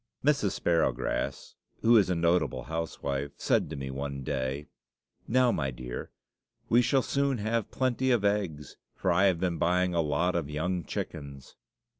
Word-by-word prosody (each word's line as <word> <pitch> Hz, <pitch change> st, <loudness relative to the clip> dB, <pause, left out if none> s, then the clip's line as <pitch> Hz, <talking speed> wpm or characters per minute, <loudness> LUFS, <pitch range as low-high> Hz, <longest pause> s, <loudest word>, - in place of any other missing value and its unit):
Mrs. 140 Hz, -10 st, +2 dB
Sparrowgrass, 70 Hz, -4 st, 0 dB, 0.3 s
who 115 Hz, +1 st, +6 dB
is 100 Hz, -5 st, +5 dB
a 90 Hz, -, +1 dB
notable 85 Hz, -4 st, +1 dB
housewife, 70 Hz, -4 st, -3 dB
said -, -, +1 dB
to 80 Hz, -, -5 dB
me 70 Hz, -1 st, -5 dB
one 70 Hz, 0 st, -4 dB
day, 70 Hz, +1 st, -2 dB, 0.6 s
"Now, 125 Hz, +1 st, +4 dB
my 70 Hz, -9 st, -1 dB
dear, 60 Hz, -1 st, -6 dB, 0.6 s
we 120 Hz, +2 st, +6 dB
shall 125 Hz, +2 st, +2 dB
soon 140 Hz, -2 st, +1 dB
have 110 Hz, 0 st, -1 dB
plenty 130 Hz, 0 st, 0 dB
of 120 Hz, -5 st, +3 dB
eggs, 95 Hz, -8 st, -1 dB, 0.2 s
for -, -, 0 dB
I 95 Hz, +3 st, +4 dB
have 95 Hz, -4 st, +3 dB
been 90 Hz, -2 st, -1 dB
buying 90 Hz, +1 st, +2 dB
a 85 Hz, -, +2 dB
lot 80 Hz, +4 st, +1 dB
of 80 Hz, -4 st, -1 dB
young 85 Hz, +4 st, -1 dB
chickens." 70 Hz, -4 st, -6 dB
85 Hz, 160 wpm, -29 LUFS, 70-105 Hz, 0.6 s, who